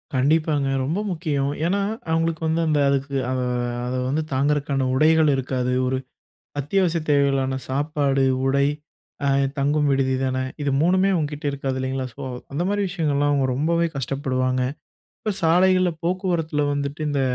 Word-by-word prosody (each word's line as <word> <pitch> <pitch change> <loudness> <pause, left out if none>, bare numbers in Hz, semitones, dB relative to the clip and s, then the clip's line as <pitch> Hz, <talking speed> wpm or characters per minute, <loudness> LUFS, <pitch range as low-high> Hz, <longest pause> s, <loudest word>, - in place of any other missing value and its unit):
கண்டிப்பாங்க, 145 +1 +2 0.2
ரொம்ப 155 +9 -1
முக்கியம். 155 -6 -1 0.2
ஏன்னா, 195 +4 +1 0.3
அவங்களுக்கு 165 0 0
வந்து 160 +1 +1
அந்த 150 -2 +2
அதுக்கு 140 0 -1 0.2
அத 130 - -1 0.5
அத 125 +1 -3
வந்து 150 +4 0
தாங்குறதுக்கான 140 0 +1
உடைகள் 155 +3 +4
இருக்காது. 125 -1 -1
ஒரு 130 - 0 0.6
அத்தியாவசிய 170 +3 +1
தேவைகளான 135 -2 +2
சாப்பாடு, 140 0 0 0.2
உடை, 140 +1 +3 0.6
அ - - +2 0.3
தங்கும் 145 +1 +2
விடுதி 135 -1 +1
தானே, 130 0 -1 0.2
இது 145 -1 0
3மே 185 +4 +3
அவுங்க 155 -5 0
கிட்ட 150 0 -8
இருக்காது. 135 -1 -3
இல்லைங்களா, 130 0 -2
ஸோ 140 - -9 0.3
அந்த 155 +5 -1
மாரி 205 0 0
விஷயங்கள்லாம், 145 -5 +1
அவங்க 140 -2 +2
ரொம்பவே 170 +4 +1
கஷ்டப்படுவாங்க. 130 -1 -1 0.6
இப்போ 215 - -1
சாலைகள்ல 185 +2 +4
போக்குவரத்துல 170 -4 0
வந்துட்டு, 145 +1 -3
இந்த 140 -1 0
145 Hz, 140 wpm, -23 LUFS, 135-165 Hz, 0.6 s, உடைகள்